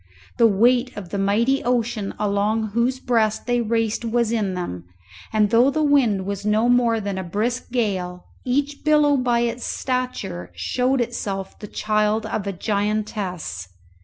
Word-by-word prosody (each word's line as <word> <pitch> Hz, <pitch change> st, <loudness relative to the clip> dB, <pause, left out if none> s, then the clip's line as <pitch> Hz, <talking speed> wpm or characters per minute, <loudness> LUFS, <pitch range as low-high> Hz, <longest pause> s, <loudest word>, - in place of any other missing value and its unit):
The 230 Hz, -, +7 dB
weight 240 Hz, +4 st, +2 dB
of 190 Hz, -4 st, -7 dB
the 200 Hz, -, -3 dB
mighty 230 Hz, +8 st, +2 dB
ocean 235 Hz, -4 st, -1 dB
along 210 Hz, +2 st, 0 dB
whose 235 Hz, +4 st, 0 dB
breast 225 Hz, -4 st, +1 dB
they 245 Hz, 0 st, +1 dB
raced 225 Hz, 0 st, 0 dB
was 230 Hz, 0 st, +1 dB
in 205 Hz, -5 st, 0 dB
them, 90 Hz, -, -5 dB, 0.5 s
and 215 Hz, -1 st, +2 dB
though 240 Hz, +3 st, +5 dB
the 310 Hz, +3 st, 0 dB
wind 245 Hz, -10 st, +3 dB
was 200 Hz, 0 st, -4 dB
no 215 Hz, +2 st, +2 dB
more 240 Hz, -2 st, +3 dB
than 200 Hz, -2 st, -3 dB
a -, -, -3 dB
brisk 215 Hz, +8 st, -2 dB
gale, 185 Hz, -7 st, -2 dB, 0.2 s
each 285 Hz, +3 st, -1 dB
billow 300 Hz, -1 st, +4 dB
by 245 Hz, -3 st, +1 dB
its 235 Hz, +1 st, -2 dB
stature 255 Hz, -, -3 dB
showed 250 Hz, -, 0 dB
itself 200 Hz, -5 st, -4 dB
the 210 Hz, -, -8 dB
child 215 Hz, +1 st, 0 dB
of 215 Hz, -2 st, -3 dB
a -, -, 0 dB
giantess. 200 Hz, -, -2 dB
220 Hz, 160 wpm, -22 LUFS, 200-245 Hz, 0.5 s, The